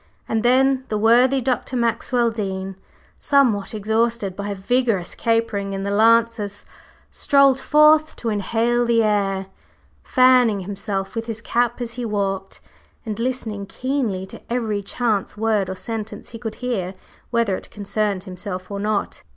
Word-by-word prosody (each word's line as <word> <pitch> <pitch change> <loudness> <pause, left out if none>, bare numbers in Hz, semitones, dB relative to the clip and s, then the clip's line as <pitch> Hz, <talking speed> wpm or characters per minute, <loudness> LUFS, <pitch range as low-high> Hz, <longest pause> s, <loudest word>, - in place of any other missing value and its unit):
And 225 - 0
then 260 +2 +3
the 215 - 0
worthy 245 +5 +4
Dr. 255 +1 -1
Maxwell 235 0 +1
Dean, 195 -3 -4 0.4
somewhat 230 -8 +2
exhausted 220 -1 0
by 205 +1 -4
vigorous 205 -2 0
capering 225 -4 0
in 195 0 -3
the 200 - -2
"Lancers," 220 -1 +2 0.5
strolled 275 -2 +4
forth 305 +3 +4
to 235 - -3
inhale 230 +3 +1
the 235 -1 +3
air, 195 -2 0 0.6
fanning 250 -5 +4
himself 195 0 -4
with 225 0 -4
his 225 -1 -4
cap 240 +1 0
as 235 -1 -3
he 245 +1 -5
walked, 195 -3 -3 0.4
and 215 -1 -4
listening 230 -5 -3
keenly 235 -4 -2
to - - -11
every 220 -4 -1
chance 210 0 -1
word 215 -3 +1
or 190 - -4
sentence 220 +2 -6
he 230 - -9
could 225 -2 -5
hear, 195 -7 -2 0.3
whether 230 -5 +1
it - - -8
concerned 205 -2 -2
himself 185 0 -6
or 200 - -3
not. 210 0 -2
220 Hz, 145 wpm, -21 LUFS, 200-240 Hz, 0.6 s, worthy